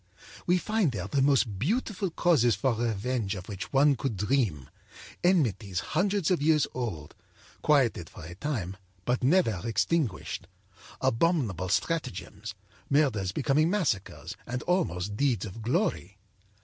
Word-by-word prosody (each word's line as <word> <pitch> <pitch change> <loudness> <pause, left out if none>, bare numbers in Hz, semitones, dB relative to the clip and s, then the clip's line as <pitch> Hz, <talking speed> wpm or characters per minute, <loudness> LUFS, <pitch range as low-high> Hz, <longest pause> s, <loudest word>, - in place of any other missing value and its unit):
We 180 +1 +4
find 210 -4 +1
there 95 -3 -3
the 135 +5 +1
most 130 -8 +2
beautiful 200 - 0
causes 150 - +3
for 125 +6 +1
revenge 115 -1 -1
of 95 -1 -8
which 100 -2 -6
one 140 +1 +5
could 130 -6 -3
dream, 105 - 0 0.6
enmities 115 - +2
hundreds 195 -2 +1
of 175 - +2
years 155 -1 +4
old, 95 - -4 0.5
quieted 125 - +2
for - - -11
a 85 - -8
time 95 - -3 0.3
but 125 +1 0
never 130 - +3
extinguished; 115 - -1 0.5
abominable 120 - +1
stratagems, 115 - -2 0.3
murders 130 -10 +2
becoming 150 - +2
massacres 155 - -1
and 125 0 -3
almost 105 - 0
deeds 125 -8 +1
of 110 +2 -8
glory. 120 - -1
125 Hz, 130 wpm, -28 LUFS, 100-155 Hz, 0.6 s, one